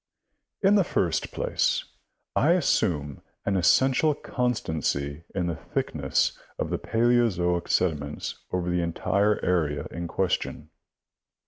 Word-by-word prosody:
— -, -, -55 dB
In 200 Hz, -, +6 dB
the 200 Hz, -2 st, +5 dB
first 85 Hz, -, 0 dB
place, -, -, 0 dB, 0.5 s
I 155 Hz, +5 st, +4 dB
assume 80 Hz, -, 0 dB, 0.2 s
an 100 Hz, -, +1 dB
essential 130 Hz, -, +4 dB
constancy 80 Hz, -, -2 dB
in 90 Hz, -2 st, 0 dB
the 85 Hz, -1 st, -1 dB
thickness -, -, -1 dB, 0.2 s
of -, -, -3 dB
the -, -, -1 dB
paleozoic 115 Hz, -7 st, +2 dB
sediments 75 Hz, -5 st, -1 dB
over 90 Hz, -1 st, -1 dB
the 90 Hz, 0 st, +1 dB
entire 100 Hz, +5 st, +1 dB
area 75 Hz, -5 st, +1 dB
in 85 Hz, +1 st, -4 dB
question. 95 Hz, +1 st, -2 dB
90 Hz, 120 wpm, -26 LUFS, 80-120 Hz, 0.5 s, In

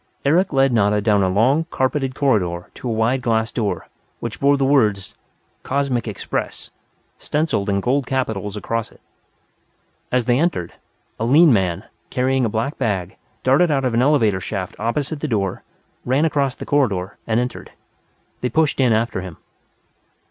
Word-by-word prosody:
Eric 170 Hz, +7 st, +3 dB
led 135 Hz, -2 st, +3 dB
Nada 105 Hz, -2 st, +3 dB
down 105 Hz, -1 st, +2 dB
a 95 Hz, -, +2 dB
long, 130 Hz, -, +2 dB
carpeted 130 Hz, 0 st, -1 dB
corridor 90 Hz, -11 st, 0 dB
to 125 Hz, -, -6 dB
a -, -, 0 dB
wide 115 Hz, +4 st, +1 dB
glass 115 Hz, -1 st, 0 dB
door, 105 Hz, -4 st, -2 dB, 0.3 s
which 115 Hz, -1 st, -5 dB
bore 140 Hz, +1 st, +4 dB
the 135 Hz, -, +1 dB
words: 110 Hz, -9 st, +2 dB, 0.5 s
COSMIC 130 Hz, -4 st, -1 dB
EXPRESS 105 Hz, -, -4 dB, 0.5 s
stenciled 150 Hz, -9 st, -1 dB
in 100 Hz, 0 st, +1 dB
gold 130 Hz, +4 st, 0 dB
capitals 110 Hz, -6 st, -2 dB
across 115 Hz, +1 st, -3 dB
it. -, -, -20 dB, 1.1 s
As 125 Hz, -2 st, +1 dB
they 120 Hz, +1 st, +2 dB
approached, 155 Hz, -, -1 dB, 0.5 s
a 110 Hz, -, 0 dB
lean 145 Hz, +4 st, +6 dB
man, 95 Hz, -2 st, 0 dB, 0.3 s
carrying 130 Hz, 0 st, +1 dB
a -, -, 0 dB
black 115 Hz, +7 st, -2 dB
bag, 95 Hz, -7 st, -1 dB, 0.3 s
darted 140 Hz, +7 st, +4 dB
out 135 Hz, -3 st, +1 dB
of 125 Hz, -, 0 dB
an 115 Hz, -, +3 dB
elevator 120 Hz, -9 st, +3 dB
shaft 95 Hz, -1 st, -5 dB
opposite 140 Hz, +7 st, -2 dB
the 155 Hz, -, -2 dB
door, 100 Hz, -7 st, -1 dB, 0.4 s
ran 135 Hz, +5 st, +2 dB
across 140 Hz, -4 st, 0 dB
the -, -, -8 dB
corridor, 105 Hz, -10 st, 0 dB
and 110 Hz, 0 st, +2 dB
entered. 125 Hz, 0 st, -4 dB, 0.7 s
They 125 Hz, -, 0 dB
pushed 155 Hz, +3 st, +1 dB
in 125 Hz, -4 st, +4 dB
after 110 Hz, -3 st, 0 dB
him. 90 Hz, -3 st, -9 dB
120 Hz, 165 wpm, -20 LUFS, 105-135 Hz, 1.1 s, lean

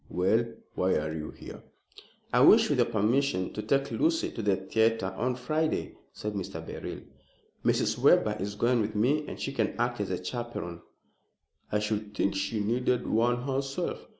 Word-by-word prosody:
"Well, 100 Hz, +6 st, +2 dB, 0.3 s
why 95 Hz, 0 st, +1 dB
are 75 Hz, +1 st, -1 dB
you 75 Hz, -1 st, -5 dB
here?" -, -, -10 dB, 0.7 s
"I -, -, +5 dB
wish, -, -, +7 dB
with -, -, +1 dB
your -, -, +4 dB
permission, 115 Hz, -2 st, +1 dB
to 105 Hz, -, -3 dB
take 140 Hz, +6 st, 0 dB
Lucy 325 Hz, +1 st, +1 dB
to 115 Hz, -, -5 dB
the 100 Hz, -2 st, +2 dB
theatre 110 Hz, +1 st, +1 dB
on 125 Hz, +2 st, 0 dB
Friday," 155 Hz, +5 st, -1 dB, 0.2 s
said 105 Hz, 0 st, -5 dB
Mr. 95 Hz, -3 st, -4 dB
Beryl. -, -, -6 dB, 0.6 s
"Mrs. -, -, +1 dB
Webber -, -, +4 dB
is 100 Hz, +1 st, -3 dB
going 120 Hz, +2 st, +2 dB
with 105 Hz, 0 st, -3 dB
me, 140 Hz, +8 st, +2 dB
and -, -, -7 dB
she 135 Hz, -, -3 dB
can -, -, 0 dB
act 120 Hz, -2 st, 0 dB
as 95 Hz, -3 st, -3 dB
chaperon." 120 Hz, -8 st, -5 dB, 0.9 s
"I 105 Hz, -, +2 dB
should 105 Hz, 0 st, -2 dB
think 100 Hz, -, +1 dB
she 100 Hz, +3 st, -1 dB
needed 125 Hz, +3 st, 0 dB
one 120 Hz, +2 st, +1 dB
herself. 135 Hz, 0 st, -3 dB
110 Hz, 170 wpm, -29 LUFS, 100-125 Hz, 0.9 s, wish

